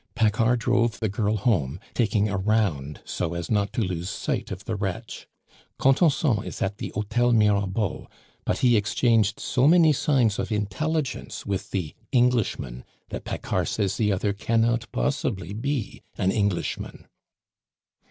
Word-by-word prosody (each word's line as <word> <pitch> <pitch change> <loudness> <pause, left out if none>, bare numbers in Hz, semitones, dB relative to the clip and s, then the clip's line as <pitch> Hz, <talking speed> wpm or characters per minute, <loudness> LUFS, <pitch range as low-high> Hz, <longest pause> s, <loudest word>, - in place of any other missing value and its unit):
Paccard 115 +1 +3
drove 120 -1 +1
the 110 - 0
girl 105 +2 0
home, 90 - 0
taking 110 -3 +2
a 100 - -2
round 95 -8 0
so 85 - -3
as 85 +4 -4
not 100 -2 +1
to - - 0
lose 90 -1 -3
sight - - -3
of 95 0 -7
the 115 - -2
wretch. 100 +3 -5 0.5
Contenson 135 - +3
is - - -7
at 100 +1 -2
the - - -4
Hotel 120 +4 +1
Mirabeau; 105 -2 +1 0.4
but - - 0
he 120 -1 +5
exchanged 110 0 +2
so 130 +2 +2
many 165 -1 +6
signs 125 -7 +2
of - - -3
intelligence 140 +9 -2
with 100 -2 -3
the 90 -6 -3 0.2
Englishman, 120 - +1 0.3
that - - -6
Paccard - - -2
says 100 -3 -1
the 105 -2 +2
other 100 +1 0
cannot 115 +2 0
possibly 100 - -1
be 130 +1 -3 0.2
an 95 - +2
Englishman." 100 -4 -2
110 Hz, 145 wpm, -25 LUFS, 100-120 Hz, 0.5 s, many